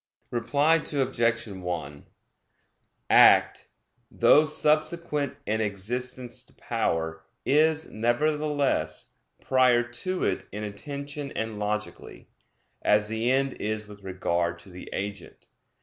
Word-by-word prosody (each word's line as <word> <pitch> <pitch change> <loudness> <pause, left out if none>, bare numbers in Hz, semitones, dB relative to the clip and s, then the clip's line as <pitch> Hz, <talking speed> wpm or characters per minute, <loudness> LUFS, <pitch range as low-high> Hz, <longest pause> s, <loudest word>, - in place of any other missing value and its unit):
Reply 140 +7 +2
Obj. 120 -4 0
1: 90 -7 -6 1.1
Act, - - +6 0.4
though 150 - +5
subsequent 150 -1 +1
in 110 +1 0
existence 120 +4 -1
to - - -18
power, 80 0 -2 0.2
is, 155 +2 +3
nevertheless, 140 - 0 0.3
prior 125 -2 +3
to 120 +10 -3
it 95 - -1
in 105 +1 -5
intention 140 +7 -6
and 110 -1 -4
logically; 105 +1 -5 0.5
as 105 0 +3
the 110 +2 -1
end 135 0 +1
is 110 0 -3
with 105 -1 -13
regard 85 -2 -1
to 95 - -15
the 90 - -10
agent. 100 -1 -6
115 Hz, 105 wpm, -26 LUFS, 100-140 Hz, 1.1 s, Act